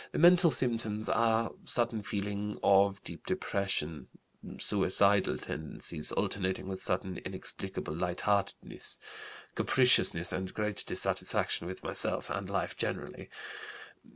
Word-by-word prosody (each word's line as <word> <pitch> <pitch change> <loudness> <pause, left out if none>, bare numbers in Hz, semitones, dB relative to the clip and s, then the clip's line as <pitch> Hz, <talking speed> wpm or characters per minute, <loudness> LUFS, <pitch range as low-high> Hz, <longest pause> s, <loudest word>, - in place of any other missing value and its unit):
"The - - -2
mental 175 +1 +7
symptoms 115 -6 0
are: 115 0 +2
sudden 120 -2 +1
feeling 105 0 -4
of 100 0 +4
deep - - -10
depression, 85 -6 -2 0.5
suicidal 100 0 +2
tendencies, 80 +1 -3
alternating 95 -1 -1
with 95 -1 -5
sudden 95 0 -2
inexplicable 75 - -6
lightheartedness. 90 +3 -1 0.6
Capriciousness 125 -9 +4
and 95 0 -3
great 105 -1 -2
dissatisfaction 85 - 0
with 95 - -7
myself - - +2
and - - -4
life - - -2
generally. - - -4
100 Hz, 105 wpm, -31 LUFS, 95-110 Hz, 0.6 s, mental